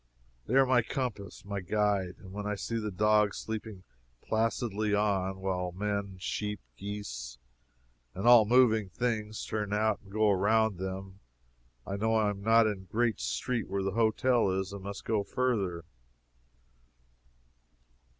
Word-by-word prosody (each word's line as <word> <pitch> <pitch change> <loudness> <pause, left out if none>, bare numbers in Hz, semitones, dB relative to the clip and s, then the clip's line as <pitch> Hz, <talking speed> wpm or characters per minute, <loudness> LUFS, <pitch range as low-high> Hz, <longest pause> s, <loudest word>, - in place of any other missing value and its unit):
They 125 - 0
are 135 0 +6
my 130 -1 +4
compass 110 -7 -5
my 100 0 -3
guide. 100 -1 0
When 100 +2 -6
I 105 - -1
see 115 +3 -3
the 105 -1 -3
dogs 105 +1 +2
sleep 110 0 -4 0.5
placidly 110 - 0
on, 95 -2 0
while 90 -2 -2
men, 100 0 -2
sheep, 105 +2 -3 0.2
geese, 100 -11 -6 0.8
and 95 - -4
all 120 -3 +8
moving 110 -3 +4
things 110 -2 -2
turn 105 -2 -3
out 110 0 +1
and 100 - -17
go 110 0 +3
around 105 +1 +2
them, 95 +1 -6 0.7
I 100 - -3
know 110 +2 +1
I 105 -2 +3
am 100 -1 -7
not 115 +2 +5
in 105 -3 -1
the 95 - -13
great 115 +1 0
street 105 - -2
where 100 0 -2
the 95 - -1
hotel 115 +1 +2
is, 95 +1 -2
and 100 - -7
must 100 +1 -7
go 110 -2 +1
further. 100 -9 -1
105 Hz, 150 wpm, -30 LUFS, 95-110 Hz, 0.8 s, all